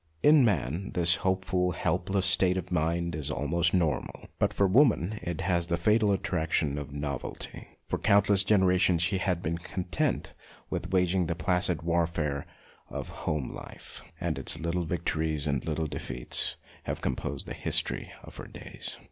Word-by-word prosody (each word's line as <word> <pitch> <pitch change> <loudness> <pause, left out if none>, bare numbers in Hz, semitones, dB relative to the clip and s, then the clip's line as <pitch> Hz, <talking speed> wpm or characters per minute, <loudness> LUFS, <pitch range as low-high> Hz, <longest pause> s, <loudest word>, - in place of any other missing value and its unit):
In 150 -2 +7
man 90 - 0
this 85 -1 +4
hopeful, 95 -1 0
help 90 +1 -1
less 95 -1 +1
state 95 -1 +5
of 90 0 -5
mind 85 0 0
is 75 -1 -3
almost 80 +4 +1
normal, 85 -5 -1
but - - +2
for 100 - +2
woman 110 - +3
it 85 +2 -4
has 85 -2 +1
the 85 0 0
fatal 105 +4 +3
attraction 80 -6 0
of 70 0 -7
novelty. 70 -2 -5 0.2
For - - -2
countless 100 -1 +4
generations 95 -4 +3
she 90 +3 +1
has 90 -2 0
been 85 -1 -3
con 90 +1 -5
tent - - -1 0.4
with - - -3
waging 90 -1 +2
the 85 - -1
placid 90 -2 +1
warfare 80 -4 0 0.4
of - - -5
home 75 -5 -3
life, - - -10 0.2
and - - -2
its 80 - +1
little 85 +1 -1
victories 80 -3 -1
and 70 -3 0
little 80 0 -1
defeats 65 -4 -2 0.3
have - - -3
composed 65 - -3
the - - -6
history - - 0
of - - -12
her - - -8
days. - - -8
85 Hz, 165 wpm, -29 LUFS, 80-95 Hz, 0.4 s, In